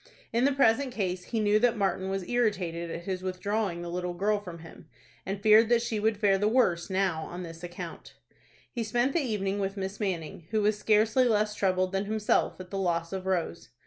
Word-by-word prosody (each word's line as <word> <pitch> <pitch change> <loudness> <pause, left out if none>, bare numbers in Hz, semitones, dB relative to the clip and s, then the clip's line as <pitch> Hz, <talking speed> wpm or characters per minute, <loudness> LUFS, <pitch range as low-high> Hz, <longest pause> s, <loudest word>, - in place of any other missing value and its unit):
In 235 +3 +3
the 280 - +4
present 275 -1 +3
case, 185 -6 -2
he 230 - -2
knew 210 0 +3
that 240 0 +2
Martin 190 -1 0
was 195 -2 -3
irritated 185 -8 0
at 165 +1 -5
his 185 0 -3
withdrawing 185 -1 -2
the 170 - -5
little 180 0 -3
girl 205 +3 +1
from 180 -4 -9
him, 165 0 -13 0.4
and 195 +1 -3
feared 220 +1 +6
that 240 -1 +3
she 230 -3 -2
would 220 0 +1
fare 200 -2 +3
the 205 - +2
worse 205 -8 +2
now 190 -4 0
on 180 +1 -7
this 165 0 -9
account. 175 0 -8 0.6
He 235 - -3
spent 240 +5 0
the - - +2
evening 205 -6 -1
with 195 0 -2
Miss 190 +1 -4
Manning, 170 -5 -4
who 215 -1 +1
was 210 +1 +3
scarcely 215 +4 +3
less 215 -2 +2
troubled 185 -2 +1
than 195 +1 -1
himself 215 -2 0
at 180 -1 -10
the 195 - -2
loss 170 -2 -1
of 190 0 -4
Rose. 170 -7 -2
195 Hz, 210 wpm, -28 LUFS, 180-220 Hz, 0.6 s, feared